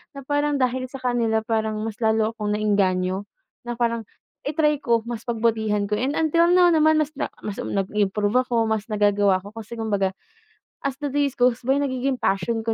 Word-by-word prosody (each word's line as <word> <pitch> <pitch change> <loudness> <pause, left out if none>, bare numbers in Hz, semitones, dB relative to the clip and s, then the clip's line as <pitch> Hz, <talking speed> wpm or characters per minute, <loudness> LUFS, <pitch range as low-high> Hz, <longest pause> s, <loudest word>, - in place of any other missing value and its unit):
na 275 - -8
parang 290 +1 +1
dahil 255 0 0
sa 270 - -7
kanila 230 -3 +1
parang 220 -2 0
mas 220 -1 -4
lalo 220 -1 +2
akong 210 -2 -2
naengganyo, 195 -2 +1 0.4
na 240 - -3
parang 235 -1 0 0.4
i-try 300 0 +1
ko, 230 -2 +1
mas 235 -2 -5
pagbutihan 220 -3 0
ko. 210 - -3
And 260 +7 0
until 335 +2 +3
now 360 0 +6
naman, 315 0 +4
mas 305 0 0
na - - -3 0.2
mas, 205 -1 -4
um, - - -5
nag-improve 205 +4 +1
ako, 235 -3 0
mas 220 0 -2
nagagawa 205 -2 +3
ako 200 +3 -11
kasi 230 +2 -9
kumbaga, 200 -4 -1 0.6
as 275 -1 -3
the 285 -2 -3
days 285 -2 0
goes 245 -1 +2
by 270 +3 +2
nagiging 260 -1 -1
passion 195 +4 0
ko 225 - +1
230 Hz, 190 wpm, -23 LUFS, 210-270 Hz, 0.6 s, now